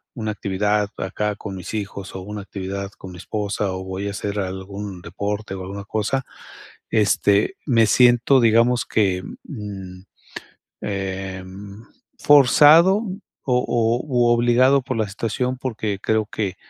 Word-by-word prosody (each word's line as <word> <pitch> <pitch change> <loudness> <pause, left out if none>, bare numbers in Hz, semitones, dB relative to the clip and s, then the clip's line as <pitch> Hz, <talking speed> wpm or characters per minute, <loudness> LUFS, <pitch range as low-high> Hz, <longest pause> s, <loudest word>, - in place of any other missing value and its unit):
una 110 -3 -3
actividad 105 +1 0
acá 105 +2 -2
con 100 -1 -7
mis 90 +2 -7
hijos 100 -2 -5
o 95 - -5
una 105 +2 -6
actividad 100 0 -5
con 95 - -10
mi 90 - -10
esposa, 100 -1 -2
o 95 0 -5
voy 95 +1 -4
a - - -4
hacer 105 0 -3
algún 95 0 -5
deporte 100 +4 -4
o 95 - -7
alguna 100 +2 -6
cosa", 110 +6 -1 0.7
este, 105 - +2
me 115 -5 +4
siento, 125 +4 +5
digamos 115 +1 +3
que, 95 -4 +1 0.2
mm, 95 -7 -8 0.8
em, 95 +1 -5 0.4
forzado 150 - +6 0.4
o 125 -2 +1
o 115 0 +1
u 125 -4 +2
obligado 120 +3 +4
por 130 0 -4
la 110 -2 0
situación, 115 +5 -2
porque 110 -6 -3
creo 110 -1 +1
que 100 -3 -3
105 Hz, 140 wpm, -22 LUFS, 95-120 Hz, 0.8 s, forzado